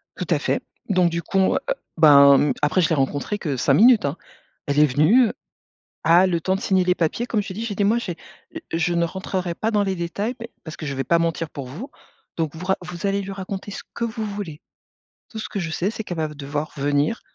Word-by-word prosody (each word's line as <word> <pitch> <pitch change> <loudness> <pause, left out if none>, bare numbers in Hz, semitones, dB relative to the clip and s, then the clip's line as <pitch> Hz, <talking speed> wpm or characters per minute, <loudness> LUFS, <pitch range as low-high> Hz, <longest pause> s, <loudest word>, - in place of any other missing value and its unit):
Tout - - -4
à - - +2
fait. - - -1 0.3
Donc, 180 -3 +3
du 170 0 -2
coup, 195 - -3
on 190 - +4
va - - +1
a - - +3 0.2
ben 140 -3 +8
mmh, 145 - +2
après, 150 +5 +2
je 160 - +2
l'ai 160 - +2
rencontrée 145 +9 -1
que 150 -8 -3
5 135 +2 +2
minutes, 225 - +6
hein. 140 +4 -2 0.5
Elle 145 +1 +1
est 150 - +7
venue 155 - +4 0.7
ah 175 +3 +5
le 170 -2 0
temps 190 +3 +1
de 195 - -5
signer 190 -1 +2
les 180 0 +2
papiers 170 +8 -1
comme 215 -4 0
je 200 - -8
t'ai 185 - -5
dit, 220 - -5
j'ai 205 - -4
dit: 205 - 0
«Moi, 215 +4 +3
j'ai 180 -8 -5 0.6
je 175 +1 +1
ne 170 0 +2
rentrerai 185 0 -3
pas 220 - -1
dans 210 -2 +2
les 195 -1 -1
détails 200 +8 -3
mais 230 0 -7
parce 160 - -8
que - - -6
je 140 -2 -3
vais 135 - -1
pas 170 +5 +2
mentir 165 -1 -1
pour 140 -3 -7
vous, 180 - -8 0.5
donc 160 -2 -2
vous 175 +3 -7
ra 190 - +2
vous 175 +1 -6
allez 200 0 0
lui 195 0 -6
raconter 195 +1 -6
ce - - -7
que - - -4
vous 220 -1 -4
voulez. 200 -7 -6 0.7
Tout 220 - -7
ce - - -5
que 200 - -4
je 165 -3 -3
sais, 180 +5 -1
c'est 220 - -5
qu'elle 175 -4 -6
va 160 -1 0
ve 150 - -10
devoir 145 +1 -4
venir 145 +9 0
175 Hz, 260 wpm, -22 LUFS, 155-200 Hz, 0.7 s, ben